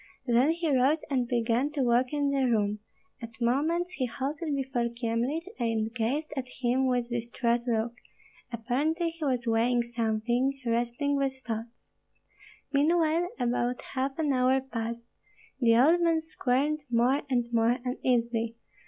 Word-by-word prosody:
Then 245 +3 +3
he 335 +1 0
rose 265 +5 +4
and 250 -3 +1
began 240 +3 +1
to 285 -3 0
walk 245 +1 +3
in 290 -1 0
the 270 -2 +1
room; 210 -2 +1 0.4
at 230 0 -9
moments 310 +9 +1
he 255 - +1
halted 285 +5 -3
before 255 -3 -1
Kyemlich 235 +7 -2
and 225 -1 -1
gazed 265 +7 -1
at 265 -2 -3
him 255 +2 +2
with 245 -1 0
distraught 235 +1 -1
look; 230 0 0 0.6
apparently 285 +9 0
he 330 -1 -9
was 255 -4 0
weighing 235 +1 +2
something, 235 +3 -1
wrestling 240 +5 0
with 270 -1 0
thoughts. 230 +1 -6 0.8
Meanwhile 325 +3 +2
about 245 0 0
half 270 0 -2
an 300 -4 +1
hour 255 +1 +3
passed; 235 -2 -5 0.5
the 230 -3 +4
old 320 +8 +5
man 330 -1 +3
squirmed 295 -1 0
more 245 +4 +3
and 240 -2 0
more 230 +1 +3
uneasily. 235 -2 0
250 Hz, 145 wpm, -28 LUFS, 235-280 Hz, 0.8 s, old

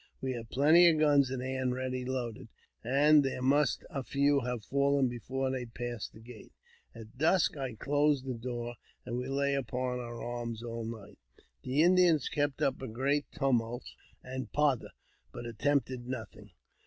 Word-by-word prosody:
We 130 - -2
had 115 -2 -7
plenty 160 +6 +6
of 160 - +2
guns 145 -3 +4
at 130 -1 -3
hand 130 -1 -1
ready 130 0 -3
loaded, 125 -4 -4 0.4
and 145 +5 +5
there 135 -1 -2
must 145 +3 +2
a 135 - -4
few 140 +2 +2
have 125 -3 -3
fallen 140 -1 +2
before 130 +3 -3
they 125 -2 -3
passed 120 -1 -5
the - - -13
gate. 115 -1 -13 0.4
At 115 +2 -12
dusk 165 +3 +3
I 130 -5 -4
closed 145 +2 +1
the 130 - -2
door, 120 0 -5 0.3
but - - -5
we 125 +1 -2
lay 140 +1 0
upon 125 -1 -2
our 120 -1 -6
arms 120 -1 -5
all 115 -1 -5
night. 110 -3 -9 0.4
The 135 +4 +2
Indians 175 -5 +4
kept 145 0 -1
up 135 -2 0
a 130 - -4
great 135 +6 -1
tumult 120 -4 0 0.4
and 130 -3 -6
pother, 145 -4 +1 0.4
but 120 - -8
attempted 130 0 -1
nothing. 110 -4 -7
130 Hz, 165 wpm, -31 LUFS, 120-140 Hz, 0.4 s, plenty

